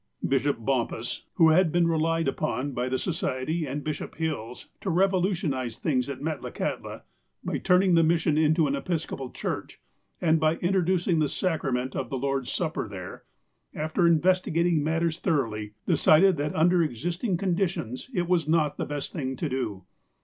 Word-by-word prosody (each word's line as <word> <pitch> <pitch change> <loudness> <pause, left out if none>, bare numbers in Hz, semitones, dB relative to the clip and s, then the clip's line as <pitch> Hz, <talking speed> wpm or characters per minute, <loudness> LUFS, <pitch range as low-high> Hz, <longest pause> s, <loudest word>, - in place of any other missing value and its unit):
Bishop 140 0 +1
Bompas, 120 -1 -2
who 165 -2 +6
had 165 +1 +4
been 175 0 +3
relied 165 0 +1
upon 135 +1 -1
by 125 0 -2
the 130 - 0
Society 160 - -2
and 140 +2 -4
Bishop 155 -1 -4
Hills, 145 -8 -4
to 195 - -4
revolutionize 175 - +1
things 130 -4 0
at 140 0 -6
Met 155 -4 -2
lakahtla, - - -4 0.4
by - - -2
turning 180 0 +3
the 165 - +6
mission 160 -1 +2
into 155 +1 +3
an 140 -1 0
Episcopal 140 -4 -3
church, - - -5 0.4
and 160 -2 +3
by 155 +1 +2
introducing 180 -1 +1
the 150 -2 +2
sacrament 130 -8 -1
of - - -3
the 135 - -2
Lord's 135 -1 -2
Supper 160 -8 -2
there, 95 -3 -8 0.5
after 160 +3 +1
investigating 170 -1 +2
matters 165 +1 0
thoroughly, 105 -8 -1
decided 180 +4 +5
that, 145 +1 -2
under 175 +2 +4
existing 170 - -1
conditions, 175 - -2
it 175 -8 -1
was 170 -4 +1
not 155 -3 +2
the - - -2
best 145 -1 -4
thing 130 -6 -3
to 160 - -2
do. 120 -8 -3
155 Hz, 160 wpm, -27 LUFS, 135-170 Hz, 0.5 s, who